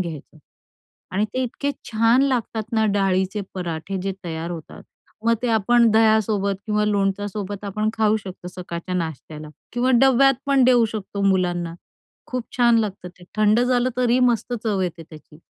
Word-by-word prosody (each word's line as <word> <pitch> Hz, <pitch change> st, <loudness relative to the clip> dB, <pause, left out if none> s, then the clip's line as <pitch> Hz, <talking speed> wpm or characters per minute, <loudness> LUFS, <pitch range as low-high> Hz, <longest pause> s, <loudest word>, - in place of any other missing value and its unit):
घ्यायचं 160 Hz, -3 st, -7 dB, 0.8 s
आणि 205 Hz, +2 st, +2 dB
ते 260 Hz, -, 0 dB
इतके 280 Hz, +3 st, -2 dB, 0.2 s
छान 230 Hz, +3 st, +4 dB
लागतात 230 Hz, -5 st, -2 dB
ना, 220 Hz, -1 st, +2 dB
डाळीचे 195 Hz, 0 st, +1 dB
पराठे 175 Hz, +1 st, -4 dB
जे 195 Hz, 0 st, -2 dB
तयार 165 Hz, 0 st, -4 dB
होतात. 165 Hz, -3 st, -8 dB, 0.4 s
मग 230 Hz, 0 st, +4 dB
ते 245 Hz, -, 0 dB
आपण 230 Hz, +1 st, +4 dB
दह्यासोबत 215 Hz, -2 st, +3 dB
किंवा 210 Hz, 0 st, +1 dB
लोणच्यासोबत 205 Hz, 0 st, -2 dB
आपण 215 Hz, +2 st, -1 dB
खाऊ 220 Hz, -1 st, +2 dB
शकतो 180 Hz, -1 st, -8 dB
सकाळच्या 180 Hz, 0 st, -6 dB
नाश्त्याला 155 Hz, -2 st, -5 dB, 0.2 s
किंवा 245 Hz, +2 st, +1 dB
डब्यात 270 Hz, +1 st, +5 dB
पण 275 Hz, -2 st, +4 dB
देऊ 245 Hz, -2 st, +5 dB
शकतो 200 Hz, -1 st, -5 dB
मुलांना. 175 Hz, -3 st, 0 dB, 0.5 s
खूप 250 Hz, -2 st, -3 dB
छान 235 Hz, -1 st, +5 dB
लागतं 200 Hz, -4 st, -4 dB
ते. 180 Hz, 0 st, -19 dB
थंड 215 Hz, +2 st, +4 dB
झालं 250 Hz, 0 st, +2 dB
तरीही 250 Hz, 0 st, +3 dB
मस्त 245 Hz, -1 st, +1 dB
चव 205 Hz, -4 st, 0 dB
येते 170 Hz, -2 st, -3 dB
त्याची. 155 Hz, -1 st, -15 dB
210 Hz, 155 wpm, -22 LUFS, 185-235 Hz, 0.8 s, डब्यात